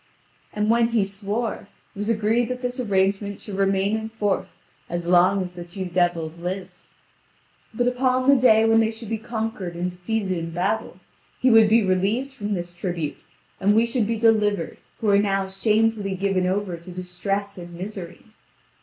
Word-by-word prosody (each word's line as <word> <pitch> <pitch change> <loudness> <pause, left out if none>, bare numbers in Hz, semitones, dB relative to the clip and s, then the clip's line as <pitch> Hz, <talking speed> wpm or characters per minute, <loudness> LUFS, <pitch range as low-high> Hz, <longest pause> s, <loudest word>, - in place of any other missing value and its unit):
And 210 +1 +1
when 235 0 +4
he 230 -4 +1
swore, 205 +3 -3 0.3
it - - -9
was 210 +2 -2
agreed 225 +2 +1
that 250 0 -4
this 250 +1 -3
arrangement 200 -2 0
should 205 - -9
remain 195 +1 +1
in 220 0 -4
force 210 -3 -2 0.3
as 175 0 -3
long 180 +2 +4
as 180 -1 -8
the 175 -1 -7
two 185 +2 -6
devils 175 -2 0
lived. 180 +1 -6 0.8
But 240 +2 0
upon 255 +1 +1
the 280 - +7
day 225 -4 +5
when 225 0 +5
they 220 -1 +3
should 225 -1 -7
be 225 -1 -2
conquered 220 -6 -4
and 180 +1 -2
defeated 190 +3 -2
in 165 -1 -4
battle, 195 +7 -2 0.4
he 255 - +4
would 225 -1 +7
be 225 +1 +5
relieved 200 +8 0
from 210 -6 -4
this 175 -2 -3
tribute, 175 -4 -3 0.4
and 205 +2 +3
we 225 +1 +5
should 235 -2 0
be 230 0 -1
delivered 210 -6 +2 0.2
who 220 - +1
are 200 - +5
now 195 -1 +1
shamefully 210 0 +1
given 190 -1 0
over 190 -2 -1
to 170 +2 -12
distress 190 +2 -3
and 175 0 -9
misery. 185 -1 -7
200 Hz, 180 wpm, -23 LUFS, 185-225 Hz, 0.8 s, the